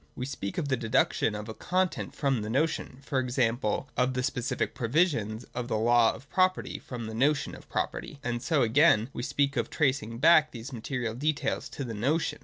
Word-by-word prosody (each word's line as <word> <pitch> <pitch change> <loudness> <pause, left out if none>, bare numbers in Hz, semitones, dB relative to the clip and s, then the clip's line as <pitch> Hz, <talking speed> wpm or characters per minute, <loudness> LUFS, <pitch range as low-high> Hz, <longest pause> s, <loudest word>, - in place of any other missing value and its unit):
We 125 - -4
speak 130 -7 -5
of 160 -5 -1
the 130 -2 +1
deduction 115 -1 +1
of 105 +1 -6
a 110 - -5
content 185 +8 -1
from 135 -5 0
the 105 - -4
notion, 135 0 -1
e.g. 130 -2 +1 0.5
of 125 +1 +1
the 125 - 0
specific 125 -1 -1
provisions 120 - 0
of 125 -1 -3
the 110 - 0
law 115 +1 +4
of 135 - -14
property 185 0 +1
from 120 -3 -7
the 110 - -6
notion 140 +5 +1
of - - -12
property; - - -3
and 120 -3 -2
so 150 -1 +2
again 120 -1 +4
we - - -4
speak 140 +2 0
of 115 - 0
tracing 130 -6 0
back 155 +3 +6
these 120 +3 -8
material 120 -1 -3
details 145 +2 -1
to 140 - -5
the 120 -3 -5
notion. 140 +10 0
125 Hz, 195 wpm, -28 LUFS, 115-145 Hz, 0.5 s, back